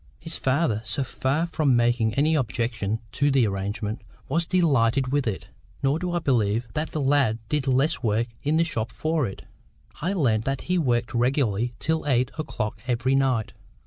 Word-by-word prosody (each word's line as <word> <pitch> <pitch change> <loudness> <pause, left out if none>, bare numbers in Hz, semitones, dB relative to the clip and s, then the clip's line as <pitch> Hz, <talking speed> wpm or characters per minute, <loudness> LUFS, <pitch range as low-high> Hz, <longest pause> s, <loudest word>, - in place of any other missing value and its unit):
His 165 0 -3
father, 130 -5 +1
so 115 +5 -1
far 135 +5 -1
from 155 -6 +1
making 120 -2 +2
any 150 +3 +3
objection 115 -5 -1
to 145 - +1
the 135 -4 +4
arrangement, 105 +2 -3 0.3
was 165 +4 0
delighted 135 -8 +2
with 145 -3 +1
it. 105 - -3 0.3
Nor 140 +3 +2
do 180 0 -2
I - - +1
believe 115 -7 +1
that 155 +1 -2
the 155 - -3
lad 135 -5 +2
did 150 -2 0
less 135 +5 +2
work 115 -1 +1 0.2
in 150 +2 +1
the 165 - +4
shop 115 -8 -2
for 155 -1 0
it: 95 - -8 0.6
I 180 +6 0
learned 115 - +1
that 135 -1 -1
he 180 0 0
worked 120 -6 0
regularly 120 -2 +1
till 160 0 -1
eight 130 -1 +2
o'clock 110 -8 -3
every 125 +2 +1
night. 130 -5 +1
130 Hz, 175 wpm, -25 LUFS, 115-150 Hz, 0.6 s, the